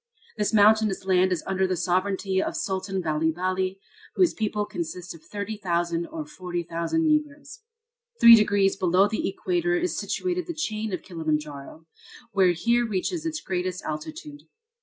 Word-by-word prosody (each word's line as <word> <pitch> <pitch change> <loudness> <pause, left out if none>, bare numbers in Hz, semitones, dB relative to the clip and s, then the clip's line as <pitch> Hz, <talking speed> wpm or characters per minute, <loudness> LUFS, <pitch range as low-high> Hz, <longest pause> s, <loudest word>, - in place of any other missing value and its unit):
This 210 - 0
mountainous 215 -2 +4
land 185 0 +3
is 180 - -1
under 190 0 0
the 185 -1 -1
sovereignty 190 +2 0
of - - -3
Sultan 190 0 -2
Bali 155 0 +1
Bali, 185 +2 -2 0.4
whose 360 -3 +3
people 210 -1 -1
consist 180 -2 -6
of 165 -2 -15
30,000 175 -5 -2
or 320 -2 -6
40,000 175 - -3
Negroes. 300 +2 -1 0.6
Three 235 0 +10
degrees 205 -3 +4
below 185 +2 +3
the 210 -1 -2
Equator 350 - -1
is 355 +1 -1
situated 360 -1 -2
the 340 - -4
chain 220 -7 -3
of 185 - -4
Kilimanjaro, 155 -3 -4 0.5
which 185 -4 +2
here 235 +1 +3
reaches 310 - -2
its 315 -1 -3
greatest 185 -1 -3
altitude. 295 - -6
195 Hz, 145 wpm, -25 LUFS, 180-235 Hz, 0.6 s, Three